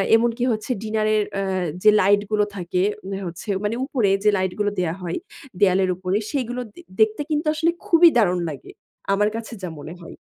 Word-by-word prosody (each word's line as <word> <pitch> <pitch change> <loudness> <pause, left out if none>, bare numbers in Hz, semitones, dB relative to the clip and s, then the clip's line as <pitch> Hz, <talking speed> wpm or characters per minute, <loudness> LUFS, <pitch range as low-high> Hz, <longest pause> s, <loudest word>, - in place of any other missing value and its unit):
এমনকি 235 +1 +1
হচ্ছে 215 +3 -3
ডিনার 215 0 0
এর 210 - +2
অ্যা 195 0 -1 0.4
যে 215 - +8
লাইট 200 +2 +4
গুলো 210 -1 +3
থাকে। 180 -1 -2 0.3
ওই 195 0 -3
হচ্ছে 175 +5 -8
মানে 210 +2 -1
উপরে 245 -8 +1
যে 210 - +5
লাইট 185 -1 -1
গুলো 205 0 +1
দেয়া 170 -3 0
হয়, 175 -1 -3 0.4
দেয়ালের 190 -1 +3
উপরে 185 +2 -1
সেগুলো 250 -3 -2
দে - - -12 0.2
দেখতে 220 +4 +3
কিন্তু 300 +1 0
আসলে 325 +2 +1
খুবই 340 0 +7
দারুণ 180 -6 +3
লাগে। 140 -4 -9 0.4
আমার 210 +1 +2
কাছে 230 +1 -6
যা 180 - -3
মনে 155 +3 -8
হয়। 170 - -11
210 Hz, 190 wpm, -22 LUFS, 185-230 Hz, 0.4 s, যে